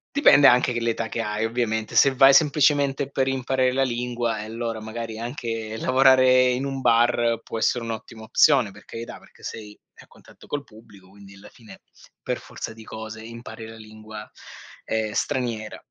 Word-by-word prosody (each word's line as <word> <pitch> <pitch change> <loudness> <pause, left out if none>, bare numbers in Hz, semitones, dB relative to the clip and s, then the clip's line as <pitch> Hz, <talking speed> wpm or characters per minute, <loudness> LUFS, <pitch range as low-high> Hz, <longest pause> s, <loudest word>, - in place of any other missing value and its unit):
Dipende 145 - +6
anche 125 0 +4
che 120 - -1
l'età 115 -1 -2
che 115 - -4
hai 105 +1 -2
ovviamente. 110 -2 -2
Se 135 -1 +5
vai 135 +1 +7
semplicemente 140 -2 +2
per 135 0 0
imparare 130 -1 0
la 135 +1 +1
lingua 120 -2 -2
e - - -7
allora 115 0 -5
magari 110 0 -6
anche 115 -3 -5
lavorare 130 0 +4
in 125 +2 -1
un 135 -1 -4
bar 115 0 +2
può 115 - -5
essere 115 +2 0
un'ottima 115 0 -7
opzione, 120 -1 +3
per 105 - -16
carità, 115 +1 -8
perché - - -21
sei 105 -2 -8 0.2
a - - -18
contatto - - -19
col 145 -1 -4
pubblico 100 -4 -18
quindi 100 0 -15
alla 95 - -14
fine 115 -2 -16 0.4
per - - -3
forza - - -8
di 110 0 -13
cose 110 0 -8
impari 115 -1 -9
la 115 - -11
lingua, 110 -1 -11 0.6
ehm, 110 -1 -2
straniera 115 -4 -3
115 Hz, 175 wpm, -23 LUFS, 110-130 Hz, 0.6 s, vai